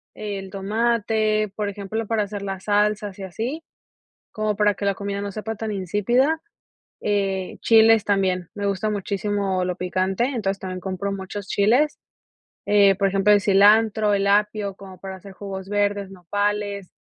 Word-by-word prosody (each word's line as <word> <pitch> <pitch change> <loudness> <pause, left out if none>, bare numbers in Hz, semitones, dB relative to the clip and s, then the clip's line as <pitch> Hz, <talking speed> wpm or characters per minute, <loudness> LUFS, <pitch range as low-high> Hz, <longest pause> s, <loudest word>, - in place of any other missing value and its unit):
el 200 -2 -5
tomate, 215 +1 0
por 210 -1 -2
ejemplo 205 +3 -4
para 220 -1 +1
hacer 205 0 -6
la 195 -1 -4
salsas 205 0 0
y - - -6
así, 235 - -4 0.7
como 215 -1 -1
para 210 -1 +3
que 200 - -4
la 200 - +2
comida 200 +1 -4
no 200 0 -4
sepa 220 +2 -4
tan 220 0 -4
insípida, 210 - +1 0.6
eh, 195 -2 -1
chiles 225 -1 +5
también, 185 -3 0
me 205 -1 -2
gusta 200 +2 -1
muchísimo 200 -2 -1
lo 180 -1 -2
picante, 185 +4 0
entonces 210 -7 -2
también 185 -1 -5
compro 190 +1 -3
muchos 195 +1 -6
chiles, 245 +11 +2 0.7
eh, 200 -2 +5
por 195 0 +2
ejemplo 195 +2 +3
el 205 - +4
cilantro, 210 +2 +4
el 200 0 +1
apio, 205 0 +1
como 190 -2 -12
para 190 -1 -7
hacer 195 +1 -12
jugos 190 -1 -7
verdes, 205 -1 0
nopales, 205 +1 -2
200 Hz, 160 wpm, -23 LUFS, 195-215 Hz, 0.7 s, chiles